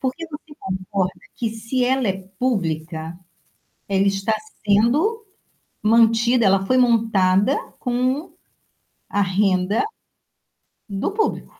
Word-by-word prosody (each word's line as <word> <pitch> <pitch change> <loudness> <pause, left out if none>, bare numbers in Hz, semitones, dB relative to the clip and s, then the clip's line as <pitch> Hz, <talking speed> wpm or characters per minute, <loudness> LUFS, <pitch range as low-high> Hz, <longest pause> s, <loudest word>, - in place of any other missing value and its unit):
Porque 270 +6 -3
você 300 -1 -10
concorda 190 0 -2 0.2
que 230 -2 -2
se 230 +3 -2
ela 260 -2 +1
é 190 - +1 0.2
pública, 165 -7 -2 0.7
ela 195 0 +2
está 195 +3 0 0.3
sendo 290 - +2 0.6
mantida, 230 +1 +4
ela 195 0 +3
foi 255 - +2
montada 225 -1 +3 0.2
com 255 +5 -1 0.8
a 205 - +1
renda 190 - +1 1.0
do 200 - -2
público. 435 +2 -2
220 Hz, 105 wpm, -22 LUFS, 195-255 Hz, 1.0 s, mantida